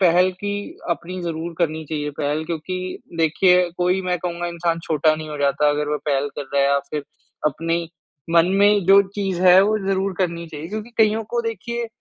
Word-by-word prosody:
पहल 180 0 +4
की 205 0 -2 0.4
अपनी 180 +2 -3
ज़रूर 165 0 -4
करनी 160 -2 -1
चाहिए 150 -1 -3
पहल, 150 +2 -1
क्योंकि 185 +3 -4 0.2
देखिए 180 +3 +4
कोई 180 +1 +2
मैं 180 -1 -1
कहूँगा 175 0 -3
इंसान 170 -1 -1
छोटा 155 0 +2
नहीं 155 0 -7
हो 150 - -6
जाता 145 +1 +2
अगर 145 0 -1
वो 150 0 -1
पहल 140 0 +1
कर 145 - -2
रहा 140 - +4
है 140 - +3
या 140 - +3
फिर 150 -2 -3 0.4
अपनी 165 +3 -1 0.4
मन 170 0 +5
में 205 -1 +4
जो 195 +1 +7
चीज़ 190 -3 -1
है 185 +1 +8
वो 215 +2 +2
ज़रूर 195 0 0
करनी 170 -2 -1
चाहिए। 155 +1 -7
क्योंकि 215 +3 -6
कइयों 220 0 +3
को 240 - +2
देखिए 235 +1 -3
170 Hz, 195 wpm, -21 LUFS, 155-190 Hz, 0.4 s, है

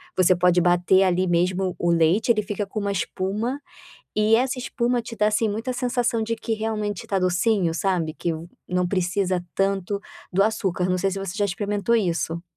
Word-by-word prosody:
você 185 0 +4
pode 180 0 +3
bater 175 +2 +4
ali 185 0 +2
mesmo 180 +2 +1
o 175 - +1
leite. 170 +8 +3
Ele 215 -2 +2
fica 205 0 -3
com 215 - -4
uma 200 0 -1
espuma, 200 +7 -2 0.6
e 215 +1 +4
essa 255 +1 0
espuma 245 -1 -1
te 230 0 -8
dá, 210 - +2
assim, 215 +1 +1
muita, 225 +5 -3
sensação 245 -2 0
de 230 +1 -1
que 225 0 -2
realmente 215 -3 -3
está 195 - -1
docinho, 180 -1 +1
sabe, 170 -4 -1
que 170 - -2
o 160 +2 -7 0.2
não 180 0 0
precisa 185 -1 0
tanto 195 0 0 0.3
do 195 +2 +4
açúcar. 190 -4 0
Não 185 - +2
sei 195 +1 +1
se 195 - -4
você 195 -1 -5
já 205 - +1
experimentou 205 +3 -1
isso. 170 -4 -1
195 Hz, 190 wpm, -24 LUFS, 180-220 Hz, 0.6 s, você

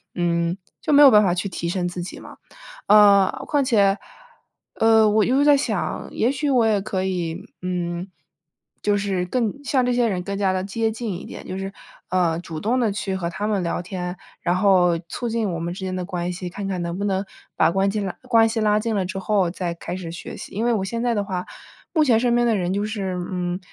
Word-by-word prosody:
嗯， 170 0 0 0.2
就 - - -1
没 290 0 +8
有 275 - +9
办 210 - +7
法 190 -4 +2
去 180 +2 -2
提 170 -2 -4
升 175 0 -1
自 175 0 -5
己 175 - -7
嘛。 - - -12 0.5
呃， 200 -2 +7 0.2
况 290 -2 +1
且， 205 -6 +3 0.8
呃， 220 -1 +5
我 210 0 +3
一 - - 0
直 275 +3 +3
在 290 -1 +7
想， 275 - -2
也 240 +4 +1
许 285 +1 -1
我 245 -4 +4
也 210 -3 +2
可 190 -2 -2
以， 175 -3 -3 0.2
嗯， 180 0 -3 0.7
就 205 -1 +2
是 195 -3 -1
更 225 +2 0
像 260 -2 +1
这 250 - +1
些 240 -1 +2
人 185 -4 -2
更 200 +1 -4
加 195 -2 +2
地 185 0 -1
接 220 +3 -1
近 220 -2 -4
一 - - -10
点， - - -9
就 185 - -5
是， 195 0 -4 0.4
呃， 170 -3 +1
主 165 -2 -7
动 235 +8 0
地 230 -4 +2
去 195 -1 -3
和 175 -3 -2
他 205 +4 -3
们 205 -3 0
聊 170 +1 -2
天， 180 0 -5 0.2
然 175 +1 +1
后 185 -3 +4
促 240 +7 -4
进 225 -3 -1
我 170 - -3
们 170 +1 -3
之 190 +1 -6
间 185 0 -3
的 185 - -3
关 180 -1 -3
系， 180 0 -5
看 195 +2 -5
看 185 -2 -2
能 170 +1 -3
不 200 - -3
能 195 -1 0 0.3
把 - - +4
关 195 +2 +2
系 215 - -2
拉 195 -2 -3
关 230 -3 +4
系 225 - -2
拉 210 -1 +3
近 225 0 -2
了 190 -2 0
之 190 +1 -4
后 190 -2 +1
再 175 -1 -3
开 175 - -6
始 175 -3 -6
学 170 - -8
习， - - -9
因 220 +4 -1
为 240 - +3
我 205 -4 0
现 230 +4 -3
在 240 -1 +1
的 205 -2 0
话 185 -3 -4 0.5
目 315 - +4
前 240 -6 +4
身 240 0 +2
边 240 0 +3
的 225 - +3
人 180 -1 -1
就 200 +1 -1
是， 200 -4 -3 0.2
嗯， 180 0 -2
195 Hz, 260 characters per minute, -22 LUFS, 180-225 Hz, 0.8 s, 有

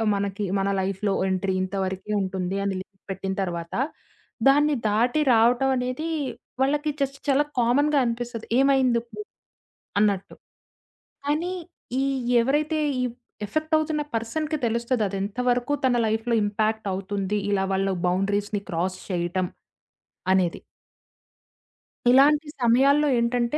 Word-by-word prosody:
మనకి 200 +1 -2 0.2
మన 195 +1 0
లైఫ్‌లో 195 +2 -1 0.2
ఎంట్రీ 190 0 0
ఇంత 185 +1 -4
వరకే 190 +2 -5
ఉంటుంది 190 0 -2
అని 200 -1 0
లిమిట్ 190 0 -16
పెట్టిన 190 0 -3
తరువాత, 170 -3 -4 0.7
దాన్ని 295 +2 +5
దాటి 245 +8 +2
రావటం 240 +4 +4
అనేది 255 +6 -2 0.5
వాళ్ళకి 295 +3 +1
జస్ట్ 275 0 -1
చాలా 280 +2 +4
కామన్‌గా 285 +5 +3
అనిపిస్తది. 235 -1 -3
ఏమైందిప్పుడు? 260 - +2 0.8
అన్నట్టు. 200 -2 +1 0.9
కానీ, 315 +5 0 0.5
ఈ - - +1 0.4
ఎవరైతే 300 +5 +1 0.2
ఈ - - +1 0.4
ఎఫెక్ట్ 310 +7 -2
అవుతున్న 310 -1 -1
పర్సన్‌కి 305 +8 -2
తెలుస్తది 235 +1 0
అదెంత 195 +2 -4
వరకు 245 +3 +1
తన 255 -1 +3
లైఫ్‌లో 225 +2 0
ఇంపాక్ట్ 215 +1 -1
అవుతుంది 195 +1 -2
ఇలా 195 -1 +1
వాళ్ళ 195 +1 +1 0.2
బౌండరీస్‌ని 200 +3 0
క్రాస్ 180 +2 -1
చేయటం 180 +1 -1 0.9
అనేది. 185 -3 +1 1.5
ఇలాంటి 290 +4 +5
సమయాల్లో 275 +5 +4
ఏంటంటే 235 +3 0
230 Hz, 115 wpm, -25 LUFS, 195-275 Hz, 1.5 s, దాన్ని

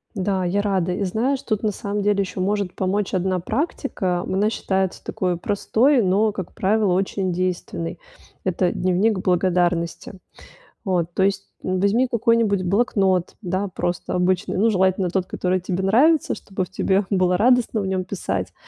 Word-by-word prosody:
Да, 190 -1 0
я 185 +3 +1
рада. 190 -3 0
И 195 - -2
знаешь, 245 +8 0
тут, 215 -3 -1
на 215 - 0
самом 205 +1 -3
деле, 205 0 +2
еще 190 -1 -5
может 200 0 -1
помочь 195 +1 -1
одна 185 0 0
практика. 215 - -2
Она 195 +4 0
считается 190 -4 -2
такою 180 -2 -2
простой, 230 - +2
но, 205 +2 +2
как 190 -4 -7
правило, 205 -1 +1
очень 190 0 -1
действенной. 175 -2 -3 0.4
Это 180 -1 +1
дневник 185 +3 +1
благодарности. 175 -2 0 0.7
Вот, 180 -5 0
то 190 - +2
есть, 195 0 0 0.2
н 185 0 -1
возьми 215 +7 +2
какой-нибудь 230 -4 +2
блокнот, 190 -2 +1
да, 190 +1 -2
просто 175 -1 -3
обычный, 180 0 0
ну, 220 +4 +3
желательно, 190 -2 +2
тот, 185 +1 -1
который 185 0 -1
тебе 185 +1 -3
нравится, 280 +11 +3
чтобы 190 -2 -4
в 180 - -8
тебе 190 +1 +1
было 185 -2 +2
радостно 240 0 +3
в 195 - -3
нем 190 -1 -1
писать. 100 - -4
190 Hz, 160 wpm, -22 LUFS, 180-210 Hz, 0.7 s, ну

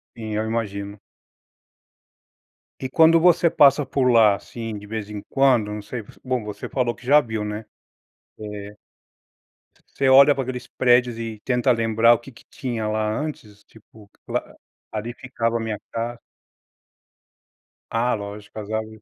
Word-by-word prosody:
Sim 110 -2 -5
eu 110 +1 -1
imagino. 100 -3 -4 1.8
E 130 - -4
quando 165 +3 +5
você 170 0 +4
passa 140 -1 +5
por 130 -1 +1
lá, 110 -4 +6
assim, 115 0 -7
de 105 0 -11
vez 110 -1 -5
em 105 -1 -6
quando 125 -6 +3
não 105 0 -5
sei, 110 +2 -6 0.2
bom 125 -3 -1
você 105 -1 -7
falou 125 -3 -1
que 125 - -17
já 145 +3 +6
viu, 110 -3 -4
né. 105 +1 -5 0.7
É. 105 -1 -8 1.2
Você 135 - +1
olha 140 +2 +8
para 135 -1 -2
aqueles 125 -1 -6
prédios 120 -2 +2
e 110 -2 -6
tenta 125 0 +1
lembrar 115 0 +4
o 120 - 0
que 135 +3 -13
que 120 - -19
tinha 120 -6 -4
lá 110 0 0
antes 110 -9 -7
tipo, 110 -1 -19 0.8
ali 110 +2 -4
ficava 120 -2 -2
a - - -3
minha 110 -2 -3
casa? 115 +1 -4 1.7
Ah, 120 +1 +1
lógico, 105 +1 -8
as 105 +1 -8
árvores. 110 0 -4
115 Hz, 150 wpm, -23 LUFS, 105-125 Hz, 1.8 s, olha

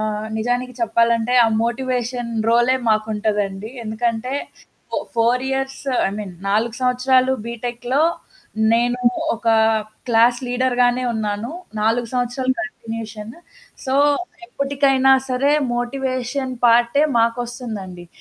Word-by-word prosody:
ఆహ్, 215 0 -2
నిజానికి 245 +3 -1
చెప్పాలంటే, 235 -6 +2
ఆ - - +4 0.2
మోటివేషన్ 245 -1 -2 0.2
రోలే 240 +3 +4
మాకుంటదండి. 210 -2 -1 0.2
ఎందుకంటే, 230 +3 -2 0.6
ఫో - - -3 0.2
ఫోర్ 235 +2 +2
ఇయర్స్ 270 0 -3 0.3
ఐ - - -4
మీన్ 195 -4 -6
4 220 +3 +1
సంవత్సరాలు 255 +1 +3
బీటెక్‌లో 240 +4 -2 0.7
నేను 245 +1 +1 0.3
ఒక 230 0 -3 0.6
క్లాస్ 235 +1 +4
లీడర్‌ 250 0 0
గానే 245 +1 +2
ఉన్నాను. 215 +2 -3 0.3
4 230 +2 +1
సంవత్సరాలు 255 +1 0
కంటిన్యూషన్. 225 0 -7 0.5
సో, 265 0 -1 0.5
ఎప్పుటికైనా 275 -3 +2 0.2
సరే 270 +3 +2 0.2
మోటివేషన్ 255 +1 -2
పార్టే 240 +5 +4 0.2
మాకొస్తుందండి. 230 -6 -3
240 Hz, 100 wpm, -20 LUFS, 225-255 Hz, 0.7 s, ఆ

